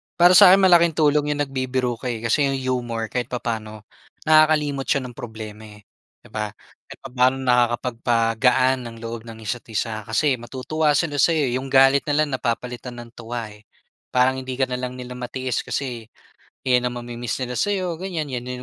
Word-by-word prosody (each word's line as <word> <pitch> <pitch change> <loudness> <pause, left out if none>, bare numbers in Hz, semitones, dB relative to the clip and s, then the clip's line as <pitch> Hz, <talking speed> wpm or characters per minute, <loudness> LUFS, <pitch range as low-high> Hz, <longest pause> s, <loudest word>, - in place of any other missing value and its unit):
Para 175 +1 +6
sa'kin 185 +1 +8
malaking 170 -3 +5
tulong 150 -1 +2
yung 145 - 0
nagbibiro 130 -3 -2
ka, 125 - -5
eh, 115 -2 -4
kasi 140 +5 +2
yung 135 - -1 0.2
humor 115 -2 -4
kahit 125 -2 -2
papaano 110 -4 -5 0.4
nakakalimot 155 -3 +3
siya 140 - +2
ng 125 -2 -9
problema, 110 -2 -8
eh, 105 - -18 0.4
'di - - -17
ba? 105 -1 -2 0.4
Kahit - - -12
papano 130 0 +2
nakakapagpagaan 120 +1 +2
ng 115 - -9
loob 115 0 -6
ng 115 -1 -10
isa't-isa 110 -1 -4
kasi 130 +3 +1
matutuwa 145 +5 -1
sila 145 -4 0
sayo, 150 -4 +3
eh, - - -1
yung 135 - -6
galit 135 +2 +4
nila 150 +1 +2
napapalitan 125 -2 -3
ng 120 -1 -10
tuwa, 115 -2 -6
eh. 105 +1 -18 0.4
Parang 130 +1 +2
hindi 130 -1 -5
ka 135 - 0
na 125 - -2
lang 125 0 -5
nila 125 0 -8
matiis 130 0 -3
kasi 120 -5 -4 0.6
'yan 125 -1 +3
ang 120 - -7
mami-miss 120 -1 -5
nila 125 -1 -3
sayo 185 - -1
ganyan, 175 -3 -4
'yan 125 -2 -5
125 Hz, 175 wpm, -22 LUFS, 115-140 Hz, 0.6 s, sa'kin